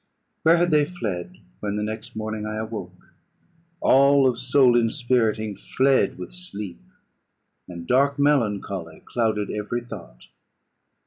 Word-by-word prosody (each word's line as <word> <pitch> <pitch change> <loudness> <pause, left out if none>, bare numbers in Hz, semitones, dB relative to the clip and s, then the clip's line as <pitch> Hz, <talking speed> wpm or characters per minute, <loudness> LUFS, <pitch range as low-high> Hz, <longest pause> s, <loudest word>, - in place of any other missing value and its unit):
Where 165 +2 +5
had 175 0 +2
they 150 -1 +5
fled 110 - -5 0.2
when 100 -1 -3
the 105 - -1
next 110 +1 -6
morning 110 0 -4
I 110 - -4
awoke? 110 -5 -7 0.7
All 140 0 +5
of 120 -2 0
soul 130 -1 +4
inspiriting 115 -3 +1
fled 130 -4 +1
with 90 - -8
sleep, 105 - -6 0.9
and 85 -2 -8
dark 140 +3 +2
melancholy 105 - 0
clouded 110 -3 -1
every 105 +3 -3
thought. 95 - -11
110 Hz, 125 wpm, -24 LUFS, 105-135 Hz, 0.9 s, Where